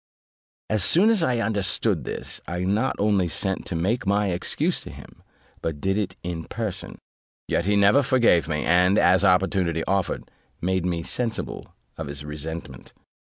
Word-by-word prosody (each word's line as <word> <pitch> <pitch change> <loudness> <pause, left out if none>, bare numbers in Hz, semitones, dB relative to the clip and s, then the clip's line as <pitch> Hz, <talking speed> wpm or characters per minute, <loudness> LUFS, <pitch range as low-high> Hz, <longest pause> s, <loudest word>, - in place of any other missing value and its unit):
As 105 -3 0
soon 200 +7 +5
as 215 -5 +3
I 130 -7 +1
understood 100 -3 0
this, - - -6
I 90 +1 -3
not 105 +8 0
only 100 -3 +2
sent 95 +3 -2
to 90 - -4
make 100 +7 -1
my 100 -1 +2
excuse 85 - -1
to - - -10
him, - - -13 0.4
but 80 -3 -3
did 95 +5 0
it 105 -2 -2
in 85 -2 -4
person: 110 -4 -5 0.5
yet 85 - 0
he 105 +1 +2
never 100 +7 +5
forgave 120 - +3
me, 75 -1 -1
and, 90 +3 +4
as 95 +2 +4
opportunity 90 -3 +2
offered, 95 -1 -2 0.3
made 95 0 0
me 85 -2 -2
sensible 110 - -3 0.2
of 80 - -4
his 70 +1 -5
resentment. 75 -3 -7
95 Hz, 165 wpm, -24 LUFS, 85-105 Hz, 0.5 s, soon